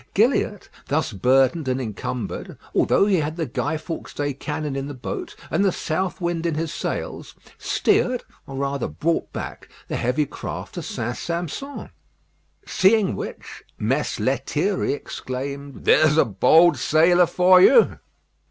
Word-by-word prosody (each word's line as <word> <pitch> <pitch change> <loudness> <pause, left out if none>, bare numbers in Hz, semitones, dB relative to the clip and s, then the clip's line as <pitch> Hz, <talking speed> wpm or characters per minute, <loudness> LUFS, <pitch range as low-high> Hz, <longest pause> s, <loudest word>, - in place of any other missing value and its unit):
Gilliatt, 215 -2 +2 0.2
thus 145 -4 0
burdened 130 - +2
and 130 0 0
encumbered, 115 0 -5 0.2
although - - +3
he 200 -2 +3
had 155 0 -2
the 165 -2 -2
Guy 160 - -2
Fawkes' 165 +1 -7
day 145 -1 -1
cannon 150 +1 -4
in 135 0 -3
the 145 - -7
boat 330 - -6 0.2
and - - +2
the 195 - +3
south 180 +3 -2
wind 170 -1 -1
in 165 - -1
his 160 0 -3
sails, - - -5 0.2
steered, 250 0 +1 0.2
or 135 - -7
rather 140 -1 -2
brought 150 - -1
back, - - -7 0.2
the - - -2
heavy 125 +5 +1
craft - - -7
to - - -5
St. 120 +2 -4
Sampson. 175 - -5 0.7
Seeing 195 +1 +3
which, - - -8
Mess - - -1
Lethierry - - 0
exclaimed, 140 +2 -6
"There's 155 0 +5
a - - +5
bold 140 - +5
sailor 175 +3 +4
for 180 +2 +5
you!" 465 - +6
155 Hz, 145 wpm, -23 LUFS, 135-180 Hz, 0.7 s, you